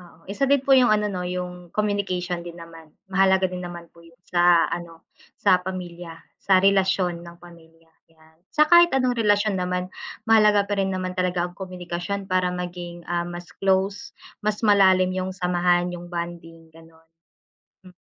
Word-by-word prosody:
oo. 175 -3 -17
Isa 265 +7 0
din 280 -1 +3
po 275 - +3
'yung 255 -2 +6
ano. 210 -1 +2
No? 180 -1 -4
'yung 180 0 -6
communication 195 -4 -1
din 170 0 -10
naman, 165 -1 -13 0.2
mahalaga 190 0 +3
din 180 0 -6
naman 175 -1 -8
po 170 - -19
'yung 165 0 -19
sa 175 -1 +4
ano, 165 -1 -7 0.3
sa 180 - +3
pamilya, 175 -2 -7 0.2
sa 190 -1 +3
relasyon 190 -3 +2
ng 170 0 -12
pamilya 165 -1 -18 0.2
yan. 160 0 -25 0.2
Sa 305 0 +3
kahit 345 0 +6
anong 255 -2 +1
relasyon 205 -2 +2
naman 180 0 -2 0.4
mahalaga 210 -2 +4
pa 205 - -1
rin 195 -1 0
naman 185 -1 -4
talaga 180 -1 0
ang 175 - -18
komunikasyon 185 +1 -5
para 185 -1 +1
maging 175 -1 -7 0.2
mas 175 0 -8
close, 195 +1 0 0.3
mas 210 0 -1
malalim 190 -3 +4
'yung 185 0 -3
samahan, 180 -1 +1
'yung 175 0 -8
bonding, 170 -1 -7
gano'n. 165 0 -19 0.8
Hmm. 180 -1 -16
180 Hz, 165 wpm, -23 LUFS, 175-195 Hz, 0.8 s, yung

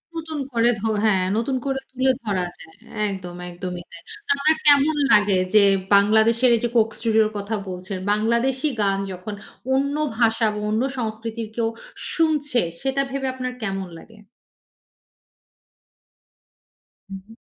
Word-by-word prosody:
নতুন 315 -2 -5
করে 235 0 +4
ধ - - -10 0.2
হ্যাঁ, 195 -4 +3
নতুন 240 +4 -1
করে 270 -1 -1
তুলে 260 +1 +2
ধরা 195 -5 -1
যায়। 160 - -14 0.4
একদম, 180 -3 -7
একদমই 175 0 -6
তাই। 170 - -12 0.3
তারমানে 280 +3 +3
কেমন 290 +1 +5 0.2
লাগে? 205 -2 +5 0.2
যে, 210 -1 +7 0.3
বাংলাদেশের 220 +4 +4
এই 225 - -2
যে 240 - +1
'Coke 225 -1 +3
Studio' 220 -1 +3
র - - -6
কথা 205 +2 -3
বলছেন, 185 +1 -5
বাংলাদেশী 235 +7 +1
গান 195 -1 +1
যখন 185 +3 -7 0.4
অন্য 280 +2 +1 0.2
ভাষা 225 -1 +3
বা 210 - -5
অন্য 220 +3 0 0.2
সংস্কৃতির 220 0 -4
কেউ 230 -1 0 0.4
শুনছে, 300 -6 +1 0.2
সেটা 270 +1 0
ভেবে 270 0 -2
আপনার 255 -1 -4
কেমন 195 -2 -3
লাগে? 225 -1 -17 2.9
উহু। 195 +3 -10
225 Hz, 135 wpm, -22 LUFS, 200-265 Hz, 2.9 s, যে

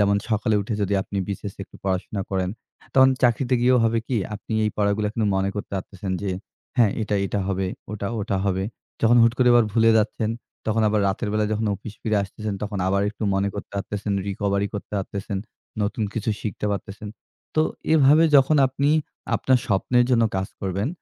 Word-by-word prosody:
যেমন 100 0 +4
সকালে 110 +1 +1
উঠে 105 +2 -3
যদি 100 +1 0
আপনি 100 - -7
বিসিএস 100 0 -5
এ - - -7
একটু - - -16
পড়াশোনা 95 +1 -1
করেন। 95 -1 0 0.5
তখন 130 0 +7
চাকরিতে 125 +1 +3
গিয়েও 125 +1 +4
হবে 115 0 +2
কি? 130 - -1 0.2
আপনি 110 - -7
এই 105 - +1
পড়াগুলা 105 0 +1
কিন্তু 115 -3 0
মনে 95 +1 +1
করতে 105 - -5
পারতেছেন 95 0 -5
যে, 100 - -1 0.5
হ্যাঁ, 115 -5 +5
এটা, 105 -1 -1
এটা 100 - -2
হবে। 95 0 0 0.3
ওটা, 100 -1 -4
ওটা 100 -1 -1
হবে। 95 -1 0 0.4
যখন 115 +1 +5
হুট 115 0 +5
করে 125 -1 +5
আবার 120 -1 +6
ভুলে 115 0 +5
যাচ্ছেন, 110 +1 0 0.4
তখন 110 0 +2
আবার 105 0 +2
রাতের 100 +3 -2
বেলায় 105 0 +1
যখন 110 +1 0
অফিস 105 +1 -9
ফিরে 110 -1 +1
আসতেছেন, 105 +1 -5
তখন 105 -1 -3
আবার 100 +1 +2
একটু 110 - -10
মনে 100 +1 +1
করতে 100 - -7
পারতেছেন, 100 +1 -3 0.2
recovery 100 0 0
করতে 105 - -6
পারতেছেন, 100 +1 -4 0.4
নতুন 105 +2 -1
কিছু 110 0 -2
শিখতে 105 -1 -3
পারতেছেন। 100 +1 -6 0.5
তো 155 - +4 0.3
এভাবে 155 +1 +6
যখন 140 +3 +5
আপনি 135 +2 0 0.5
আপনার 130 -1 +3
স্বপ্নের 120 +5 +2
জন্য 115 -2 +4
কাজ 95 0 -2
করবেন, 100 +4 -1
105 Hz, 190 wpm, -24 LUFS, 100-115 Hz, 0.5 s, তখন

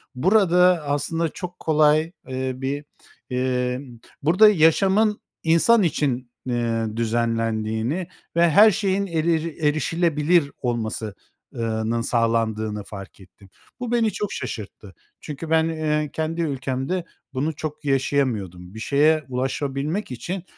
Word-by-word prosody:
burada 180 +1 +4
aslında 160 +3 -1
çok 180 +2 -8
kolay, 155 +1 +3 0.2
eee, 130 0 -2
bir, 140 +3 -4 0.4
emm, 125 -1 -2 0.2
burada 190 +8 +6
yaşamın 195 +5 +3 0.2
insan 175 +7 +4
için, 130 -6 -1
eee, 115 -2 -1
düzenlendiğini 115 +5 -1 0.3
ve 170 0 +5
her 210 +6 +7
şeyin 195 +1 0
erir 165 -1 -1
erişilebilir 155 +1 +2
olması 110 -4 -3 0.4
ııı, 110 -1 -2
nın 115 0 0
sağlandığını 110 -3 0
fark 100 -1 -10
ettim. 95 +1 -18 0.3
Bu 245 -1 -4
beni 230 -3 +2
çok 210 +2 -3
şaşırttı. 105 -2 -7 0.3
Çünkü 155 +2 -7
ben, 160 0 +3
eee, 150 -2 -1
kendi 160 +1 -2
ülkemde 135 +3 -2 0.3
bunu 145 +4 -1
çok 150 0 -6
yaşayamıyordum. 115 -10 -1
Bir 110 - -8
şeye 150 +6 +3
ulaşabilmek 140 +7 -2
için, 170 +10 -5
145 Hz, 115 wpm, -23 LUFS, 120-165 Hz, 0.4 s, her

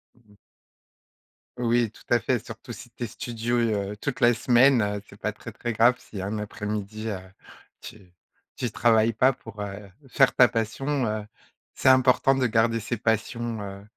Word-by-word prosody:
Mmh 120 - -27
mh. 105 - -22 1.2
Oui, 120 -2 +1
tout - - -18
à 120 - +4
fait, 125 +1 0
surtout 120 +1 -10
si 120 +1 -10
tu 120 - -7
es - - -2
studieux 115 -3 -2
toute 140 -3 -3
la 120 +1 +6
semaine, 120 +2 +4
heu, 105 -1 -2
c'est - - -15
pas - - -2
très, - - -10
très 120 - -4
grave 115 +3 +4
si 100 - -8
un 100 +3 -3
après-midi, 105 +1 -5
heu, 100 -3 -3 0.6
tu 95 -5 -13 0.4
tu 120 -3 -3
travailles 115 0 +3
pas 130 +5 +3
pour, 115 -3 -13
heu, 100 0 -7 0.2
faire 135 0 +3
ta 125 - +6
passion, 125 +4 -1
heu. 105 -1 -3 0.5
C'est - - +2
important 130 +1 +4
de 130 -2 +1
garder 115 0 +2
ses 115 +2 -3
passions, 115 +1 -1
heu, 100 0 -8
115 Hz, 175 wpm, -25 LUFS, 105-120 Hz, 1.2 s, la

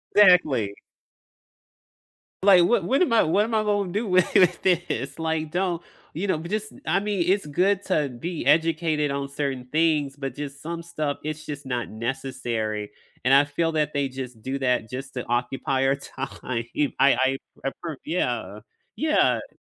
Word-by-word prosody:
Exactly. 150 - +5 1.7
Like, 190 -3 +7
what 195 -1 +3
when 270 - +3
am 235 - +1
I 225 - +6
what 195 +7 +3
am 225 +1 -4
I 215 - +3
gonna 205 -3 0
do 210 +3 -1
with 185 -1 +4 0.4
thi 175 -2 +3
this? 140 +6 -4
Like, 160 -1 -1
don't 175 -2 -1 0.3
you 185 +5 -2
know, 175 -5 0
but 170 +2 -7
just 215 +1 -3
I 175 +5 +3
mean, 205 -3 0
it's 195 -2 +2
good 185 +6 +1
to 150 -7 +1
be 155 +5 -5
educated 155 -1 +2
on 140 0 -3
certain 140 -3 -3
things, 155 -3 +2
but 135 -3 -4
just 140 -1 -6
some 170 +1 -5
stuff, 155 -4 -3
it's 155 0 -5
just 145 -2 -7
not 120 -2 -2
necessary, 115 -3 -3 0.3
and 130 - +2
I 140 +1 +7
feel 165 +3 -1
that 150 -1 0
they 140 -1 0
just 125 -3 -7
do 130 +4 -3
that 125 -4 0
just 135 +2 -6
to 125 - -4
occupy 130 +2 0
our 135 +1 +3
time. 135 -1 -6 0.2
I 120 +4 -2
I 135 -1 +4 0.3
I 135 - +1
pref 160 -5 -4
yeah, 120 - -2 0.4
yeah. 310 +1 +1
150 Hz, 175 wpm, -25 LUFS, 135-175 Hz, 1.7 s, Like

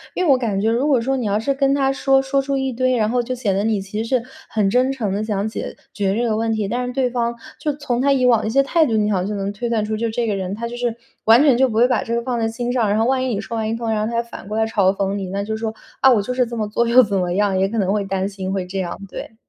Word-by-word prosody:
因 365 - 0
为 305 - +4
我 - - +7
感 215 -6 -1
觉 220 +3 +1
如 245 +5 +1
果 275 -4 +4
说 265 +4 0
你 250 -5 -2
要 205 0 +1
是 275 +6 0
跟 275 0 +1
他 270 -1 +1
说， 270 0 +3
说 270 +1 0
出 275 0 -2
一 265 -1 -1
堆， 255 +1 +1
然 215 -2 +2
后 245 +2 +1
就 255 +2 -4
显 230 -6 -1
得 195 +2 0
你， 220 -1 +1
其 200 +3 -4
实 225 - -7
是 255 -3 +1 0.3
很 210 -3 +1
真 255 +3 +3
诚 225 -8 -2
地 205 +2 -1
想 210 -1 -1
解 220 - -6 0.2
决 195 -1 0
这 235 - 0
个 220 - 0
问 225 +1 0
题， 215 -2 -1
但 245 +4 -2
是 - - -3
对 255 -1 0
方 235 -1 -1 0.2
就 300 - -1
从 255 -4 -2
他 280 +1 +3
以 260 -2 +2
往 235 -3 +4
的 215 - -3
一 - - 0
些 275 +4 +3
态 320 +3 +2
度， 230 - -1
你 210 0 +1
好 200 - +1
像 180 - -2
就 210 - -3
能 200 0 -3
推 235 +4 -4
算 220 -2 0
出 215 +1 -2
就 230 +1 -1
这 235 +2 -1
个 215 - 0
人， 190 0 -3
他 235 +2 -4
就 240 - -7
是 240 -1 -2 0.3
完 225 +3 +7
全 280 -5 +5
就 260 0 +3
不 220 - -5
会 235 +2 +5
把 250 -3 +1
这 235 - -2
个 235 - 0
放 245 -1 -2
在 225 - +1
心 240 +2 -3
上。 235 -5 +1
然 205 - +1
后 225 - +2
万 260 +1 +1
一 - - -1
你 - - -2
说 220 +2 -5
完 220 -1 -1
一 225 - -1
通， 230 0 -4
然 215 -1 0
后 215 - -1
他 230 - -2
又 235 - +1
反 235 -4 -11
过 210 +1 -3
来 220 - +2
嘲 200 -4 +2
讽 195 0 -1
你， 195 -2 -4
那 200 +2 -2
就 220 +1 -3
是 - - -6
说： 220 -1 -2 0.3
“啊， 265 - +7
我 225 -4 +4
就 250 +5 -3
是 250 0 +2
这 235 0 -7
么 215 -1 -1
做， 235 +3 0
又 240 +2 +7
怎 205 -3 -2
么 180 -1 0
样。” 200 0 +1
也 190 +1 +2
可 225 +3 -4
能 195 -2 +1
会 210 -1 0
担 195 0 -1
心 195 -1 -5
会 190 -2 -2
这 190 +2 -4
样， 175 -2 -4
对。 225 - -8
225 Hz, 380 characters per minute, -20 LUFS, 205-250 Hz, 0.3 s, 我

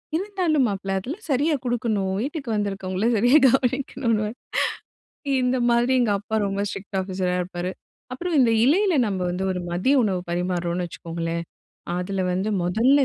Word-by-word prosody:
இருந்தாலும் 350 -7 +1
மாப்பிள! 195 -1 -4
அதெல்லாம் 305 - -7
சரியா 295 +4 +2
குடுக்கணும், 220 -5 0
வீட்டுக்கு 280 -1 -4
வந்திருக்கவங்கள 195 -1 -2
சரியா 245 +8 +5
கவனிக்கணுன்னுவாரு. 245 -4 0 1.1
இந்த 250 +1 +2
மாதிரி 240 +2 +3
எங்க 230 -4 +2
அப்பா 220 +2 -4
ரொம்ப 200 0 -1
ஸ்ட்ரிக்ட் 195 0 -5
ஆஃபீஸரா 185 -1 -2
இருப்பாரு. 180 0 -4 0.4
அப்பறம் 330 +4 -1
இந்த 235 -2 +4
இலையில 375 +6 +3
நம்ம 195 -2 -2
வந்து 185 +2 -3
ஒரு 180 - -2
மதிய 190 +11 +2
உணவு 185 -4 0
பரிமாருறோம்ன்னு 175 0 -1
வச்சுக்கோங்களேன், 170 0 -4 0.6
அதுல 190 +1 -2
வந்து 190 +4 -1
மொதல்ல 245 +10 +4
210 Hz, 140 wpm, -24 LUFS, 185-260 Hz, 1.1 s, சரியா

